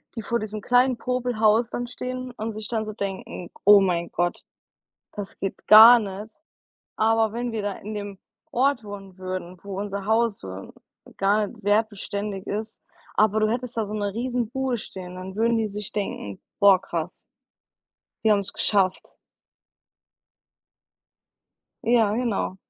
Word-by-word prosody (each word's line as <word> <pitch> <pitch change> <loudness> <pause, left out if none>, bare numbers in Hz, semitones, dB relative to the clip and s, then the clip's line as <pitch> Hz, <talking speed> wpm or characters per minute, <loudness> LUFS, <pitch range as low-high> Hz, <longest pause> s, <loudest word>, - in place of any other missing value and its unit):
die 225 - -3
vor 235 +2 -1
diesem 215 0 -5
kleinen 250 +1 +3
Popelhaus 235 -2 +1
dann 245 0 -3
stehen 255 +1 -5
und 220 0 -3
sich 215 0 -6
dann 220 -2 -2
so 215 - -6
denken: 195 -3 -5 0.2
„Oh 205 0 +9
mein 170 -2 0
Gott, 175 0 -1 0.7
das 205 -2 -7
geht 195 - -5
gar 225 +3 +10
nicht.“ 210 0 -6 0.6
Aber 225 0 +2
wenn 240 0 -3
wir 220 - -2
da 205 -1 -1
in 215 +2 -8
dem 205 -2 -6 0.3
Ort 260 -1 +1
wohnen 195 -2 -10
würden, 185 -1 -5
wo 195 -1 -6
unser 200 -1 -4
Haus 220 -1 +2
so 95 0 -9 0.5
gar 205 +2 +2
nicht 225 +2 -13
wertbeständig 205 -1 -1
ist, 215 +2 -5 0.4
aber 215 0 +3
du 215 - +3
hättest 245 0 -3
da 220 - 0
so 210 - -7
'ne 205 -2 -2
Riesenbude 250 +1 -1
stehen, 180 -3 -9
dann 185 +1 -8
würden 230 +1 +2
die 220 - 0
sich 205 0 -7
denken: 150 - -4 0.2
„Boah 200 -2 +6
krass.“ 170 -3 -3 1.1
„Die 220 - +4
haben's 200 -2 +2
geschafft.“ 190 -3 0 2.7
Ja, 225 -3 +3
genau. 225 -6 -1
210 Hz, 150 wpm, -24 LUFS, 195-230 Hz, 2.7 s, gar